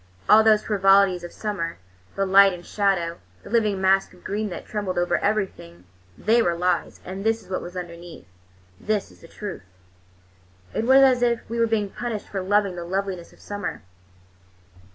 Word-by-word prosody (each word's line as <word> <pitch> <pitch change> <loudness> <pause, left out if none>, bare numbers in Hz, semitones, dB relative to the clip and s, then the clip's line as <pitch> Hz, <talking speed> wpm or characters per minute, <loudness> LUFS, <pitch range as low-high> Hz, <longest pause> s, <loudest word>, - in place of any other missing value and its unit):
All 220 +1 +7
those 215 -1 +4
frivolities 195 -3 +3
of 175 - -7
summer, 190 -6 -4 0.4
the 195 - 0
light 195 0 +6
and 175 -1 -9
shadow, 185 -5 0 0.2
the - - -11
living 215 -4 +1
mask 190 0 +2
of 180 - -21
green 210 +2 -2
that 175 - -7
trembled 205 -4 -3
over 175 -1 +1
everything, 190 - -2 0.3
they 230 +3 +3
were 175 -6 +1
lies, 180 +2 -1
and 190 +2 -6
this 225 +1 0
is - - -16
what 185 - -2
was 175 +1 -8
underneath. 170 -1 -9 0.5
This 210 - -2
is - - -20
the - - -13
truth." 205 +3 -7 1.1
It 225 - -1
was 265 +2 +7
as 255 -2 +4
if 235 -1 0
we 235 +1 -4
were 230 - +3
being 210 -3 -1
punished 235 -4 -5
for 195 - -3
loving 200 0 +1
the 175 - -5
loveliness 185 -1 -4
of - - -21
summer. 205 0 -6
195 Hz, 180 wpm, -24 LUFS, 180-215 Hz, 1.1 s, All